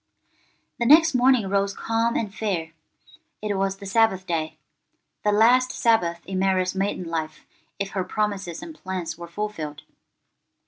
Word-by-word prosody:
THE 235 - +1
next 320 +3 +7
morning 250 -4 +4
rose 200 0 0
calm 230 +1 0
and 210 -3 -2
fair. 180 -7 -2 0.7
It 210 -1 -2
was 195 0 -1
the 200 - -10
Sabbath 195 -2 +2
day; 160 -3 -2 0.7
the 210 - +3
last 245 +4 +4
Sabbath 175 -7 +1
in 190 -1 -3
Mary's 185 -1 +1
maiden 195 -1 -1
life 160 -1 -4 0.3
if 200 -1 -3
her 190 - -1
promises 195 -3 -3
and 330 - -8
plans 185 - -5
were 170 +1 -9
fulfilled. 165 -6 -5
195 Hz, 145 wpm, -24 LUFS, 180-225 Hz, 0.7 s, next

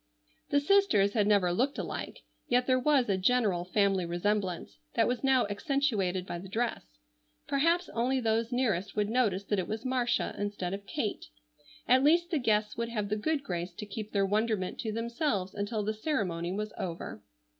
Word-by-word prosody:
The 285 - +4
sisters 285 - +3
had 210 -3 +2
never 195 -4 +3
looked 260 +9 0
alike, - - -5 0.2
yet 245 +1 +2
there 255 0 +3
was 270 -1 +3
a 195 -2 +1
general 200 -4 +2
family 195 0 +2
resemblance 175 - -2 0.2
that - - +3
was 245 +1 -2
now 265 -2 +4
accentuated 205 - 0
by 175 - -5
the 190 +2 -10
dress; 195 - -3 0.5
perhaps 335 +6 +2
only 250 +3 0
those 225 0 0
nearest 215 -6 0
would 210 0 0
notice 215 -6 +1
that 205 0 0
it 180 - -2
was 220 +3 -4
Marcia 255 -2 0
instead 205 -3 -3
of 200 0 -6
Kate. 225 -9 -3 0.6
At 260 +2 +5
least 340 +4 +4
the 315 - +1
guests 215 -3 +1
would 235 0 -2
have 210 -3 -2
the 210 - +1
good 280 +7 -1
grace 175 -4 -4
to 210 - -6
keep 210 +1 -6
their 200 -1 +2
wonderment 210 -1 0
to 220 - -2
themselves 230 - -1
until 210 +1 -2
the 215 +1 -1
ceremony 190 - -2
was 210 +2 -3
over. 165 - -5
215 Hz, 180 wpm, -30 LUFS, 195-250 Hz, 0.6 s, At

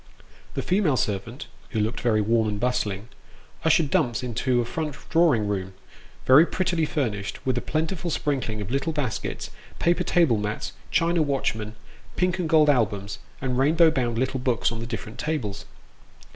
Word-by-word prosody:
The - - -2
female 180 -8 +2
servant 110 +7 -2 0.2
(who 110 - -2
looked 110 +3 -1
very 110 -3 +2
warm 110 +1 +2
and 105 -1 -3
bustling) 115 -3 -1 0.5
ushered 160 -2 +3
Dumps 125 -5 +1
into 125 +1 0
a 120 - 0
front 150 +3 -3 0.2
drawing 160 -11 +4
room, 95 -2 -3 0.5
very 135 +5 +8
prettily 175 -2 0
furnished, 110 -10 -3
with 130 -2 +1
a 120 - -1
plentiful 160 +3 -2
sprinkling 130 -9 -1
of 100 +3 -5
little 140 +5 0
baskets, 140 -8 -3 0.3
paper 170 0 +2
table 165 -10 +3
mats, 105 +1 -3 0.2
china 170 0 +2
watchmen, 115 -7 -1 0.4
pink 180 0 0
and 170 -3 -1
gold 155 -2 +5
albums, 105 -7 +1 0.2
and 130 -1 -1
rainbow 160 +4 +5
bound 120 -6 -1
little 130 +2 0
books 125 -3 +1
on 115 - -5
the 115 - -5
different 115 -1 -6
tables. 130 -11 -3
125 Hz, 160 wpm, -25 LUFS, 110-155 Hz, 0.5 s, very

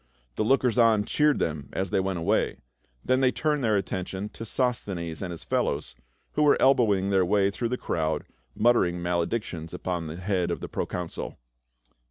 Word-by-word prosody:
The - - 0
lookers 125 0 +2
on 110 -3 +4
cheered 150 +4 +3
them 75 -3 -2
as 95 -1 -2
they - - +2
went 95 -1 -1
away; 85 - +1 0.5
then 130 0 +3
they 130 -1 +4
turned 150 -1 0
their 110 -3 +3
attention 95 +1 -3
to 115 - -9
Sos 125 +1 0
thenes 85 -4 -5
and 95 - -3
his 85 -2 -7
fellows, 65 - -1 0.4
who - - -1
were 150 -1 +5
elbowing 105 -8 +3
their 95 -1 +4
way 100 +2 +2
through 115 +3 -2
the 125 - -1
crowd, 80 -7 -1 0.3
muttering 105 -7 +3
maledictions 85 -1 -2
upon 85 -3 -3
the 80 +2 -6
head 90 -1 0
of 85 - -2
the - - -6
proconsul. 90 -2 -4
95 Hz, 180 wpm, -27 LUFS, 85-120 Hz, 0.5 s, were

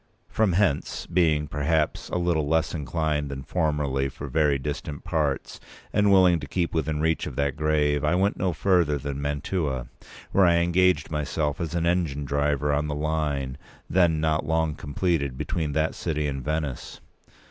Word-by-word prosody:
From 110 -5 +1
hence, 90 -6 0
being, 80 -4 +2
perhaps, 75 +2 0
a - - -1
little 85 -4 +1
less 80 +1 +1
inclined 75 -1 -1
than 70 -1 -6
formerly 75 -5 0
for 70 +1 -8
very 75 0 +2
distant 70 +1 -5
parts, 75 -4 -2 0.3
and 105 -1 +3
willing 90 -3 +5
to 70 - -7
keep 85 +4 -1
within 80 -1 -1
reach 80 +1 0
of - - -7
that 70 -1 0
grave, 75 -1 +1
I 75 +3 +2
went 95 +3 +2
no 95 -1 0
further 85 -3 +2
than 70 0 -5
Mantua, 70 -2 -2 0.4
where 95 -2 +5
I 85 - +4
engaged 85 -2 +2
myself 75 0 -1
as 85 0 -3
an 85 -1 0
engine 85 -5 0
driver 70 0 0
on 75 +1 0
the 75 - -2
line, 75 -3 -2 0.3
then 85 -3 +3
not 80 0 +1
long 80 0 0
completed, 70 -3 -1
between 75 +1 -2
that 80 +1 +1
city 75 -3 -2
and 70 -2 -4
Venice. 75 -2 -3
75 Hz, 170 wpm, -25 LUFS, 70-85 Hz, 0.4 s, willing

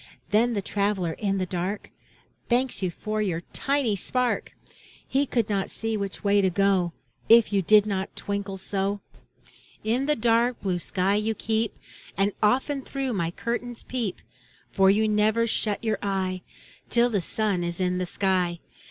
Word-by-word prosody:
Then 230 +3 +3
the 200 - -1
traveler 200 -4 0
in 195 +1 -1
the 185 - 0
dark. 185 +3 -3 0.6
Thanks 250 0 +1
you 185 - +1
for 215 +4 -3
your 175 -5 -1
tiny 275 -6 +1
spark! 250 +6 -1 0.5
He 275 +2 +1
could 235 -4 +1
not 200 -2 -1
see 225 0 -3
which 200 -1 -4
way 200 0 +4
to 190 - +3
go, 185 -2 +2 0.4
If 225 -2 +6
you 200 - +3
did 210 +3 +5
not 195 -2 -3
twinkle 200 -1 -3
so. 195 +1 -2 0.8
In 240 +6 0
the 300 - +3
dark 235 +1 +2
blue 185 -3 -1
sky 185 +3 0
you 220 +1 0
keep, 220 +1 -1 0.4
And 195 +1 +2
often 265 +6 +2
through 270 -1 -3
my 170 -5 0
curtains 235 +5 -4
peep. 235 -7 -3 0.5
For 195 -1 +4
you 215 +2 +3
never 215 +2 +3
shut 215 -2 0
your 220 -2 0
eye 190 -2 -1 0.5
Till 240 +1 +3
the 200 -4 +1
sun 200 0 -1
is 170 +1 -3
in 180 0 0
the 180 - -2
sky. 180 -3 0
205 Hz, 165 wpm, -26 LUFS, 190-230 Hz, 0.8 s, If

